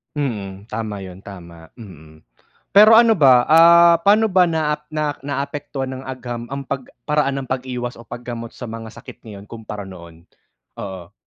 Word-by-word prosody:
Mm, 105 -8 -5
tama 105 -2 -5
'yun 95 0 -11
tama, 85 -4 -12
mm, 80 - -14 0.5
pero 215 +2 +7
ano 225 -1 +6
ba, 130 -5 +5
ah, 170 +1 +7
pano 215 +2 +4
ba 185 -2 +4
naap 150 -3 -2
na 150 -2 -2
naapektuhan 140 -1 -4
ng 130 0 -7
agham 120 -2 -6
ang 140 - -4
pag 135 -2 -4 0.2
paraan 140 -1 -1
ng 130 - -11
pag-iwas 125 -1 -4
o 115 - -13
pag 120 +3 -9
gamot 115 -1 -7
sa 125 - -8
mga 115 0 -8
sakit - - -14
ngayon 105 -2 -11
kumpara 105 -3 -8
noon? 85 -3 -13 0.6
Oo? 95 -2 -8
125 Hz, 165 wpm, -20 LUFS, 100-150 Hz, 0.6 s, pero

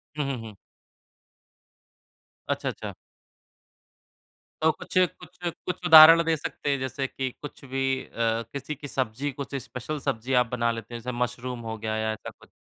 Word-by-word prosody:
हुँ, 150 -2 -1
हुँ, 130 - -3
हुँ। 110 -3 -9 1.9
अच्छा, - - -1
अच्छा। - - -6 1.7
तो 160 0 +5
कुछ - - -6
कुछ 180 -1 -1 0.3
कुछ 180 0 -4
उदाहरण 165 +1 +10
दे 165 -1 +3
सकते 145 - -4
हैं 140 -1 +1
जैसे 130 +1 -2
कि 130 0 -3
कुछ 145 -1 -9
भी 135 +1 -3 0.2
अ, - - -21 0.4
किसी 140 +2 -4
की 145 - -8
सब्ज़ी, 130 +2 -2
कुछ 140 +1 -6
स्पेशल 135 +4 -5
सब्ज़ी 130 -1 -2
आप - - +1
बना 120 -1 +1
लेते 115 +1 -7
हैं? 115 - -5
जैसे 125 +2 -4
मशरूम 125 0 -2
हो 110 - -4
गया 110 0 -3
या 110 0 0
ऐसा 110 - -8
कुछ? - - -19
130 Hz, 165 wpm, -26 LUFS, 120-145 Hz, 1.9 s, उदाहरण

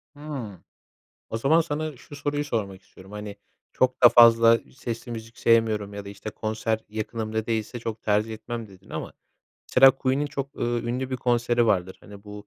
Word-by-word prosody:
Hıı. 135 - -7 0.7
O 115 - -2
zaman 155 +8 +4
sana 155 -1 -4
şu 145 - -12
soruyu 145 +1 -2
sormak 100 -7 -3
istiyorum: 95 +1 -17
Hani, 105 -1 -7 0.4
"Çok 130 0 +1
da 120 - +11
fazla 115 -1 +7 0.2
sesli 120 0 -5
müzik 115 0 -8
sevmiyorum 110 -3 +2
ya 100 0 -7
da - - -7
işte, 100 +2 -7
konser 110 +1 -2
yakınımda 110 0 -3
değilse 115 +1 -2
çok 115 -1 -5
tercih 105 +1 +1
etmem." 115 +1 -6
dedin. 95 -1 -18
Ama - - -6 0.6
mesela 135 +1 +8
Queen'in 135 +2 -1
çok, 140 -1 -6
ııı, 120 0 -1
ünlü 125 +2 -3
bir 130 - -1
konseri 120 -1 +1
vardır, 95 -3 +1
hani, 100 0 -13
bu, 105 0 -10
115 Hz, 175 wpm, -25 LUFS, 105-130 Hz, 0.7 s, da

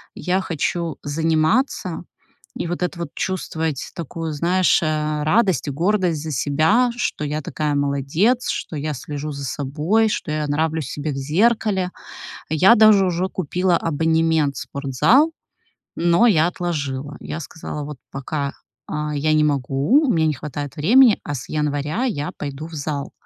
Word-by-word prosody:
я 185 +1 0
хочу 170 -1 -2
заниматься. 165 - 0 0.6
И - - -2
вот 175 +1 -4
это 180 -1 -3
вот 170 -4 -4
чувствовать 160 -6 -3
такую, 165 -1 -5
знаешь, 175 +5 +2
э, 155 -1 -1
радость 190 - +2
и - - -2
гордость 175 0 0
за 160 - -4
себя, 160 - +2
что 150 - -2
я 150 +1 -2
такая 150 +1 -2
молодец, 145 - +1
что - - -3
я 150 +1 -2
слежу 145 +3 -5
за 140 -1 -6
собой, 155 - 0
что 150 - -3
я 155 0 -1
нравлюсь 155 -1 -1
себе 150 +1 -3
в - - -6
зеркале. 190 - +1 0.6
Я 185 +9 +6
даже 215 -3 +6
уже 180 +1 0
купила 180 +1 0
абонемент 160 -2 +1
в - - -5
спортзал, 145 - +2 0.6
но 170 +7 +4
я 165 -7 +4
отложила. 145 -6 -3
Я 160 - -6
сказала: 150 -1 -6
"Вот 145 -1 -7
пока, 140 +1 -3 0.4
э, - - -5 0.2
я 155 +2 +1
не 155 0 +4
могу, 145 - +2
у 245 - +3
меня 160 -2 +2
не 155 - +1
хватает 145 0 -6
времени, 225 - +5
а 145 - -4
с 125 - -7
января 150 - -1
я 150 - -2
пойду 145 +2 -5
в 165 - -13
зал". 145 -1 -4
155 Hz, 155 wpm, -21 LUFS, 145-180 Hz, 0.6 s, Я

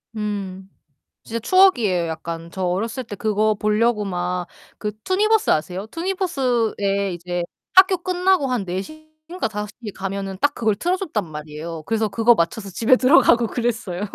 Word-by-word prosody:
음. 195 -3 -4 0.5
진짜 230 +1 -4
추억이에요, 235 - +4
약간. 165 +1 -6
저 190 - -4
어렸을 220 +8 -1
때 215 -3 -8
그거 215 +1 +1
보려고 215 +1 +1
막 180 -1 -2 0.3
그 210 - -3
투니버스 425 +3 +2
아세요? 180 +5 -1
투니버스에 245 - 0
이제 175 0 -3 0.3
학교 375 0 +7
끝나고 365 -3 +1
한 245 -6 -1
4 180 +1 -2
시인가 310 - -7
5시에 210 +1 -6
가면은 195 0 -4
딱 290 - +3
그걸 220 -3 +1
틀어 355 - 0
줬단 300 - -2
말이에요. 155 +1 -7
그래서 225 -1 0
그거 225 +4 +4
맞춰서 195 +4 -1
집에 225 +7 +4
들어가고 250 -3 +5
그랬어요. 220 -6 -2
215 Hz, 335 characters per minute, -22 LUFS, 185-265 Hz, 0.5 s, 학교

